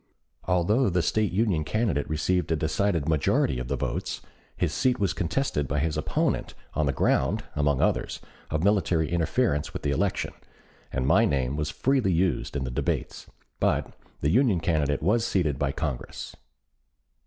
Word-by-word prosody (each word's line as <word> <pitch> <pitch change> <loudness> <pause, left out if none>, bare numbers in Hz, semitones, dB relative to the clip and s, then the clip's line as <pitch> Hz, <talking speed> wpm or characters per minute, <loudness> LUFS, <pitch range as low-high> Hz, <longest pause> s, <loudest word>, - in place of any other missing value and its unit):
Although 100 +7 +2
the 90 -1 +1
State 110 +4 +1
Union 95 -5 +1
candidate 95 - 0
received 85 +3 0
a - - +3
decided 80 +1 0
majority 70 -4 +2
of 60 - -4
the - - -1
votes, - - -3 0.4
his - - 0
seat 130 -1 +1
was 100 -3 +1
contested 80 - -1
by 70 - -1
his 75 +2 0
opponent - - -1 0.2
on 75 -2 +1
the - - +2
ground, 65 - +1
among 75 -2 +2
others, - - 0 0.3
of 75 +1 -1
military 90 -6 +2
interference 85 - 0
with - - -6
the 70 - +1
election, 70 - -1 0.6
and 65 0 -1
my 70 - +5
name 65 -2 0
was 75 0 -2
freely 125 - +1
used 90 -2 0
in 70 - -1
the 65 - -4
debates; - - -2 0.3
but - - +1 0.3
the 75 - +2
Union 115 -5 +3
candidate 75 -4 0
was 110 +6 +3
seated 80 - 0
by 70 -1 +1
Congress. 70 -4 -5
80 Hz, 165 wpm, -26 LUFS, 75-100 Hz, 0.6 s, my